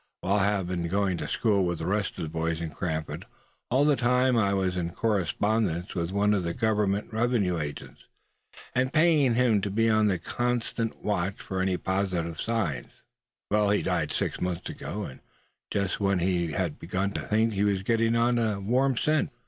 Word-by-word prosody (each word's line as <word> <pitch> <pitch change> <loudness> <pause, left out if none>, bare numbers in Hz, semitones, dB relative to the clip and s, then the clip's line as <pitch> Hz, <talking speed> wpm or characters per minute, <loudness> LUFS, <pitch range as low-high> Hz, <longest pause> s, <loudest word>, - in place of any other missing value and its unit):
While 100 +3 +1
I 95 - +3
have 100 -2 +1
been 85 -1 -2
going 95 0 0
to - - -4
school 105 -4 +2
with 85 -1 -1
the 80 - -5
rest 105 +3 -1
of 90 - -3
the 80 - -4
boys 80 +1 -2
in 85 -2 -4
Cranford, 80 -1 -4 0.4
all 135 +4 +3
the 150 -1 +4
time 125 0 +2
I 105 -4 +3
was 95 -2 0
in 85 -2 -1
correspondence 100 -1 0
with 85 -2 -2
one 100 +2 +2
of 100 - +1
the 85 -1 -3
Government 105 -2 0
revenue 110 -7 +1
agents, 75 -2 -7 0.7
and 130 +1 +1
paying 155 -6 +4
him 120 -4 +3
to 100 - -2
be 115 +3 +2
on 110 -1 +3
the 95 -3 +1
constant 120 +4 -2
watch 100 -2 -1
for 95 -1 -3
any 95 -1 +1
positive 90 -4 -2
signs. 110 - -2 0.6
He 105 -1 +2
died - - 0
six - - -2
months 90 -2 -2
ago, 105 +3 -5
and 65 - -8 0.5
just 100 -2 -1
when 100 -1 +2
he 85 -2 0
had 90 -6 -2
begun 95 +3 -2
to - - -3
think 110 +1 +1
he 100 0 0
was 100 -2 +1
getting 115 +2 +2
on 120 +1 +3
a 110 -3 0
warm 125 +6 +1
scent." 155 +2 +1
100 Hz, 190 wpm, -27 LUFS, 90-115 Hz, 0.7 s, the